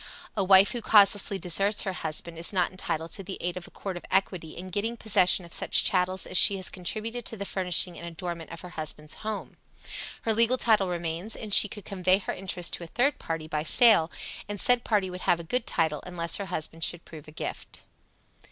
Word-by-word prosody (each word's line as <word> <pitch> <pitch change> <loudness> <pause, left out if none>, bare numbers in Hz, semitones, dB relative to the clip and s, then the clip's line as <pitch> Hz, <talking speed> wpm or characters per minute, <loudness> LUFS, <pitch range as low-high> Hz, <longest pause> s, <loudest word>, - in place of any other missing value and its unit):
A 200 - 0
wife 190 +1 +6
who 240 - -4
causelessly 205 -2 +4
deserts 195 +4 +1
her 190 - -3
husband 165 0 -4
is 165 +1 +1
not 185 -3 0
entitled 165 -3 -3
to - - -4
the 190 +1 -7
aid 175 0 -3
of 180 -1 -8
a - - -14
court 190 -3 -6
of - - -10
equity 185 -4 -1
in 185 +2 -8
getting 225 +5 -3
possession 195 -5 +3
of 170 - -8
such - - +4
chattels 185 0 +1
as 185 - +2
she 200 - +5
has 185 - 0
contributed 220 +6 -5
to 225 - -4
the 200 - -5
furnishing 180 -2 +2
and 170 - -8
adornment 170 -1 -6
of 170 - -8
her 180 - -10
husband's 155 -2 -6
house. 215 -2 -5 0.7
Her 225 - +1
legal 230 +3 +3
title 215 -6 +2
remains, 175 +4 -2
and 215 -2 -6
she 210 - +7
could 205 -1 -10
convey 185 -1 +1
her 195 - -5
interest 180 -2 -3
to - - -3
a - - -8
third 260 - 0
party 160 -1 -5
by 155 -1 -2
sale, 170 0 +5 0.4
and 205 -1 -5
said 245 +2 +5
party 200 -4 0
would 180 0 -8
have 175 - +2
a - - -7
good 240 +9 -2
title, 160 -3 0
unless 170 -2 -2
her 200 - -5
husband 165 -1 -4
should 175 +1 -1
prove 155 -1 -12
a - - -11
gift. 155 - -7
185 Hz, 220 wpm, -27 LUFS, 170-205 Hz, 0.7 s, she